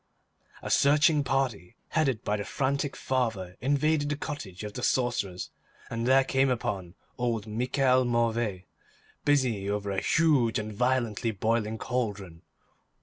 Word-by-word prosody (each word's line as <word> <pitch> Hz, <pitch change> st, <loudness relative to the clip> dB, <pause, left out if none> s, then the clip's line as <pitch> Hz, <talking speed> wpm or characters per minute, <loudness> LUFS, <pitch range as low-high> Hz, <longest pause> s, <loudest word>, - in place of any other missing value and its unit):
A -, -, -4 dB
searching 150 Hz, +1 st, +4 dB
party, 125 Hz, -9 st, -1 dB
headed 135 Hz, -8 st, 0 dB
by 105 Hz, -, 0 dB
the 105 Hz, -, -3 dB
frantic 140 Hz, +4 st, -1 dB
father, 110 Hz, -9 st, -2 dB
invaded 145 Hz, +3 st, +1 dB
the 145 Hz, -, 0 dB
cottage 110 Hz, -, -6 dB
of 105 Hz, -1 st, -6 dB
the 125 Hz, -, -5 dB
sorcerers 120 Hz, -8 st, -1 dB, 0.4 s
and 115 Hz, +1 st, -2 dB
there 135 Hz, +1 st, +6 dB
came 135 Hz, 0 st, +2 dB
upon 100 Hz, -7 st, -3 dB, 0.2 s
old 115 Hz, -4 st, -1 dB
Michel 125 Hz, +4 st, +2 dB
Mauvais, 115 Hz, -5 st, 0 dB, 0.6 s
busy 125 Hz, -9 st, +2 dB
over 100 Hz, -1 st, -2 dB
a 95 Hz, -, -1 dB
huge 145 Hz, -9 st, +3 dB
and 110 Hz, -1 st, -4 dB
violently 120 Hz, -1 st, 0 dB
boiling 110 Hz, +1 st, 0 dB
cauldron. 105 Hz, -10 st, -3 dB
120 Hz, 135 wpm, -28 LUFS, 105-135 Hz, 0.6 s, there